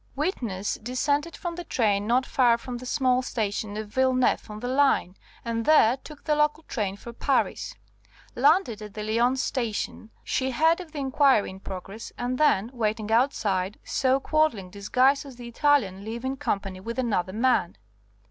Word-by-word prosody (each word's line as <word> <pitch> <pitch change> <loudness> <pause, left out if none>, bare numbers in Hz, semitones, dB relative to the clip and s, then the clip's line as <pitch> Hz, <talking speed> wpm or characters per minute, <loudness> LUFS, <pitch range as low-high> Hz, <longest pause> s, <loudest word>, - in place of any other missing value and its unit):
"Witness 235 - -2
descended 285 +7 -1
from 345 -1 -4
the 350 +1 -6
train 205 -8 0
not 250 +3 +2
far 240 -3 +3
from 245 +1 -6
the 255 - -8
small 255 -2 +2
station 210 -3 -3
of 215 -1 -5
Villeneuve 255 0 +1
on 210 0 -7
the 245 - -4
line, 260 -8 +2 0.3
and 230 0 -1
there 255 -5 +5
took 290 +2 -13
the 305 - +1
local 300 +1 +1
train 205 -9 -3
for 235 +3 -10
Paris. - - -1 0.6
Landed 275 - +3
at 210 -1 -9
the 210 - -4
Lyons 240 +4 +1
Station, 225 -2 -3
she 260 0 -1
heard 320 +6 +3
of 340 -4 -11
the 305 - -9
inquiry 270 -5 +3
in 190 - -11
progress, 195 +3 -8
and 250 +1 -2
then, 235 -7 +3
waiting 220 -2 -2
outside, 210 -6 +1
saw 265 0 +1
Quadling 270 - 0
disguised 255 +8 +2
as 275 -3 -11
the 240 0 -9
Italian 235 -7 +1
leave 230 +4 -6
in 265 +1 -1
company 195 -7 -3
with 230 +5 -6
another 200 -7 -1
man. 230 - +1
245 Hz, 170 wpm, -26 LUFS, 210-270 Hz, 0.6 s, there